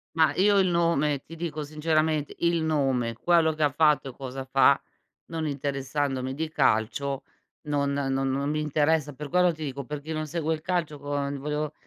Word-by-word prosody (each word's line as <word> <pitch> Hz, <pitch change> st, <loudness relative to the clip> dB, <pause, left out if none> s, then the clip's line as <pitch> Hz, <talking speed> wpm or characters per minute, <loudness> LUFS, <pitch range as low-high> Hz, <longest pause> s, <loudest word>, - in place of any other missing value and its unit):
Mah, 160 Hz, -2 st, +4 dB
io 200 Hz, +1 st, +4 dB
il 190 Hz, -1 st, +4 dB
nome 165 Hz, -5 st, +1 dB
ti 165 Hz, -, -11 dB
dico 155 Hz, -2 st, -4 dB
sinceramente, 155 Hz, 0 st, 0 dB
il 170 Hz, -1 st, +1 dB
nome, 135 Hz, -7 st, +1 dB
quello 160 Hz, +5 st, +3 dB
che 155 Hz, -, -7 dB
ha 145 Hz, -, +4 dB
fatto 150 Hz, -1 st, +2 dB
e -, -, -11 dB
cosa 135 Hz, 0 st, -6 dB
fa, 135 Hz, +1 st, +4 dB, 0.4 s
non 165 Hz, -1 st, -4 dB
interessandomi 135 Hz, -1 st, -2 dB
di 160 Hz, +2 st, -3 dB
calcio, 135 Hz, 0 st, +1 dB, 0.4 s
non 140 Hz, -1 st, 0 dB
no 140 Hz, -1 st, -1 dB
non 135 Hz, +2 st, 0 dB
mi 155 Hz, 0 st, 0 dB
interessa, 150 Hz, 0 st, +1 dB
per 145 Hz, +1 st, -7 dB
quello 180 Hz, 0 st, +3 dB
ti 155 Hz, 0 st, -8 dB
dico 140 Hz, -1 st, -5 dB
perché 150 Hz, +1 st, -6 dB
chi 160 Hz, -, -4 dB
non 155 Hz, 0 st, -2 dB
segue 160 Hz, +1 st, -1 dB
il 155 Hz, -, -11 dB
calcio 165 Hz, -4 st, -1 dB
con 140 Hz, 0 st, -3 dB
volevo 150 Hz, +2 st, -3 dB
150 Hz, 185 wpm, -27 LUFS, 140-160 Hz, 0.4 s, Mah